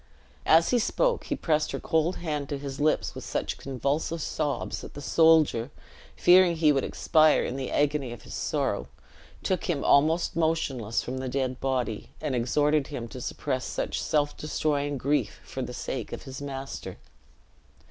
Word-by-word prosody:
As 165 Hz, +1 st, +5 dB
he 245 Hz, -, +4 dB
spoke, 485 Hz, -, +1 dB
he -, -, -1 dB
pressed 155 Hz, -2 st, 0 dB
her -, -, -2 dB
cold 165 Hz, +3 st, +1 dB
hand 150 Hz, -4 st, -3 dB
to 145 Hz, -, -2 dB
his 140 Hz, -1 st, -6 dB
lips 155 Hz, +1 st, +1 dB
with -, -, -8 dB
such -, -, -3 dB
convulsive 140 Hz, +5 st, -2 dB
sobs 150 Hz, -2 st, -2 dB
that -, -, -10 dB
the -, -, -6 dB
soldier, 155 Hz, -6 st, +4 dB, 0.5 s
fearing 180 Hz, -1 st, +6 dB
he 160 Hz, -2 st, +4 dB
would 135 Hz, -2 st, +1 dB
expire 155 Hz, -2 st, +3 dB
in 125 Hz, -, -3 dB
the 135 Hz, -1 st, -3 dB
agony 145 Hz, -3 st, 0 dB
of 120 Hz, -, -9 dB
his -, -, -10 dB
sorrow, -, -, -1 dB, 0.6 s
took 185 Hz, -, -1 dB
him 160 Hz, -6 st, -1 dB
almost 160 Hz, +5 st, +3 dB
motionless 140 Hz, -9 st, 0 dB
from 130 Hz, +1 st, -4 dB
the 130 Hz, 0 st, -3 dB
dead 130 Hz, -1 st, -2 dB
body, 125 Hz, -5 st, -2 dB
and 150 Hz, -3 st, -2 dB
exhorted 145 Hz, +4 st, +2 dB
him 125 Hz, -5 st, -5 dB
to 125 Hz, -, -8 dB
suppress 130 Hz, +1 st, -3 dB
such -, -, -3 dB
self 145 Hz, -2 st, +1 dB
destroying 145 Hz, -2 st, -1 dB
grief 145 Hz, +3 st, 0 dB
for 130 Hz, -, -6 dB
the 125 Hz, -, -4 dB
sake 125 Hz, -1 st, -5 dB
of -, -, -6 dB
his 135 Hz, 0 st, -8 dB
master. 135 Hz, -1 st, -6 dB
145 Hz, 170 wpm, -27 LUFS, 130-160 Hz, 0.6 s, fearing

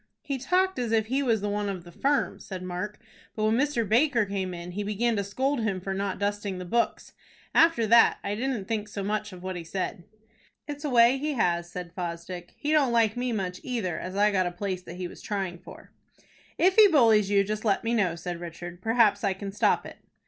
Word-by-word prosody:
"He 275 Hz, -2 st, -3 dB
talked 365 Hz, +5 st, +1 dB
as 240 Hz, -2 st, -2 dB
if 220 Hz, -1 st, +2 dB
he 260 Hz, +5 st, 0 dB
was 225 Hz, -6 st, +1 dB
one 205 Hz, 0 st, -1 dB
of 185 Hz, -3 st, -5 dB
the 175 Hz, -, -13 dB
firm," 280 Hz, +10 st, 0 dB
said 185 Hz, -2 st, -7 dB
Mark; 185 Hz, +4 st, -5 dB, 0.4 s
"but 215 Hz, -, -2 dB
when 220 Hz, +1 st, +3 dB
Mr. 255 Hz, -4 st, +1 dB
Baker 240 Hz, 0 st, +3 dB
came 195 Hz, -2 st, -3 dB
in, 175 Hz, 0 st, -7 dB
he 200 Hz, +4 st, -4 dB
began 215 Hz, +3 st, 0 dB
to 200 Hz, -, 0 dB
scold 265 Hz, +7 st, -1 dB
him 200 Hz, -4 st, -1 dB
for 195 Hz, +1 st, -4 dB
not 195 Hz, 0 st, -2 dB
dusting 205 Hz, -1 st, -2 dB
the 180 Hz, -, -6 dB
books. 235 Hz, +7 st, -1 dB, 0.4 s
After 330 Hz, -9 st, +4 dB
that 230 Hz, +2 st, +6 dB
I 200 Hz, -, -2 dB
didn't 235 Hz, -2 st, -2 dB
think 215 Hz, -2 st, -2 dB
so 205 Hz, -1 st, -5 dB
much 210 Hz, +1 st, -2 dB
of 180 Hz, -1 st, -11 dB
what 185 Hz, 0 st, -4 dB
he 175 Hz, -, -5 dB
said." 175 Hz, +1 st, -4 dB, 0.6 s
"It's 290 Hz, 0 st, -6 dB
a 295 Hz, -, -1 dB
way 245 Hz, +1 st, +5 dB
he 300 Hz, +2 st, -1 dB
has," 175 Hz, -7 st, 0 dB
said 175 Hz, -2 st, -7 dB
Fosdick. 175 Hz, 0 st, -6 dB
"He 295 Hz, -, -2 dB
don't 290 Hz, -5 st, +3 dB
like 225 Hz, -2 st, +3 dB
me 245 Hz, 0 st, -1 dB
much 185 Hz, -4 st, -3 dB
either, 225 Hz, -9 st, -3 dB
as 185 Hz, +1 st, -6 dB
I 205 Hz, +1 st, +4 dB
got 185 Hz, -2 st, +1 dB
a -, -, -3 dB
place 185 Hz, 0 st, -4 dB
that -, -, -10 dB
he 180 Hz, 0 st, -4 dB
was -, -, -12 dB
trying 190 Hz, -4 st, -3 dB
for." -, -, -13 dB, 0.7 s
"If 375 Hz, +3 st, +3 dB
he 430 Hz, -1 st, +10 dB
bullies 225 Hz, -, +4 dB
you, 200 Hz, -1 st, +4 dB
just 215 Hz, +2 st, -4 dB
let 205 Hz, -4 st, +1 dB
me 230 Hz, +1 st, 0 dB
know," 190 Hz, -7 st, +1 dB
said 175 Hz, 0 st, -5 dB
Richard. 175 Hz, +1 st, -8 dB
"Perhaps 225 Hz, -2 st, +3 dB
I 200 Hz, -2 st, +2 dB
can 195 Hz, +1 st, -6 dB
stop 205 Hz, -, +2 dB
it." -, -, -10 dB
205 Hz, 230 wpm, -27 LUFS, 185-235 Hz, 0.7 s, he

